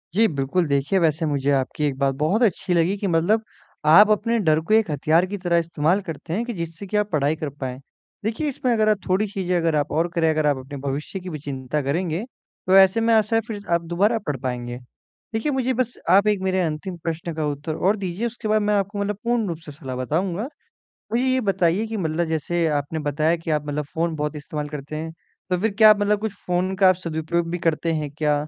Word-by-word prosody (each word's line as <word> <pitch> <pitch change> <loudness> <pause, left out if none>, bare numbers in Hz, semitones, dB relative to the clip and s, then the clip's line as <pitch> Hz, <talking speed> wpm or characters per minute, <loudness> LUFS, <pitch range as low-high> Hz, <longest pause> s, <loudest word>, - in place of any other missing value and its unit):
जी 225 +2 +5
बिल्कुल, 150 +4 0
देखिए 145 +6 +1
वैसे 160 0 +1
मुझे 145 -2 0
आपकी 135 +3 0
एक 140 -2 -1
बात 135 -1 +1
बहुत 155 - +1
अच्छी 185 -3 +1
लगी 170 +3 +2
कि, 200 - -2
मतलब 185 +6 +2 0.4
आप 195 +8 +8
अपने 230 +3 +2
डर 155 -6 +3
को - - +4
एक 220 -4 +4
हथियार 155 +4 +2
की 200 +2 -5
तरह 175 -2 +1
इस्तेमाल 170 +2 +1
करते 165 -2 -6
हैं 225 +6 -1
कि 240 - -4
जिससे 170 +1 -6
कि 210 - -1
आप 210 0 +1
पढ़ाई 150 -1 +1
कर 155 -2 -4
पाएँ। 130 -1 -4 0.4
देखिए 230 +8 -1
इसमें 255 -2 -1
अगर 215 -2 +3
आप 210 - +3
थोड़ी 190 +4 +2
चीज़ें 185 -2 -2
अगर 165 -2 +1
आप 145 -1 0
और 165 +3 +1
करें 165 -1 +3
अगर 155 -1 +1
आप 145 -2 +2
अपने 135 +2 -8
भविष्य 140 +7 -4
की 185 0 -8
भी 155 -3 -5
चिंता 140 0 -3
करेंगे, 165 +6 -1 0.4
तो 185 - +5
ऐसे 195 +3 +6
में, 230 0 +3
आशा 220 0 +3
है 225 - +3
फ़िर 210 -3 -5
आप 170 - +2
दोबारा 210 +6 +3
पढ़ 145 -3 -1
पाएँगे। 120 -1 -4 0.6
देखिए, 225 +7 0
मुझे 260 -1 0
बस 245 -1 -1 0.2
आप 200 +3 +5
एक 210 -2 +2
मेरे 190 0 0
अंतिम 170 +2 -3
प्रश्न 165 0 -3
का 155 -1 -1
उत्तर 145 +2 -3
और 195 +6 +2
दीजिए 195 +3 -3
उसके 230 -1 -6
बाद 215 0 +3
मैं 210 0 +1
आपको 200 +1 -1
मतलब 200 0 -1
पूर्ण 235 -2 +1
रूप 170 -3 -3
से 150 - -8
सलाह 135 -3 -7
बताऊँगा। 170 - -1 0.7
मुझे 245 +3 +2
ये 260 0 +2
बताइए 195 -1 +1
कि 225 0 -4
मतलब 170 -2 -1
जैसे 160 +2 0
आपने 145 +3 -4
बताया 155 +3 +1
कि 165 -1 -6
आप 150 -1 0
मतलब 150 0 -2
फ़ोन 165 0 0
बहुत 150 0 -2
इस्तेमाल 150 0 -5
करते 150 0 -6
हैं 160 +1 -5 0.4
तो 180 - +2
फ़िर 220 +3 +1
क्या 215 -1 +9
आप 210 -1 +4
मतलब 205 0 +2
कुछ 220 -1 -2
फ़ोन 180 +2 0
का 190 -1 +6
सदुपयोग 170 -1 -2
भी 175 - -2
करते 165 0 0
हैं 155 -2 -2
क्या? 150 -1 +2
170 Hz, 230 wpm, -23 LUFS, 150-205 Hz, 0.7 s, क्या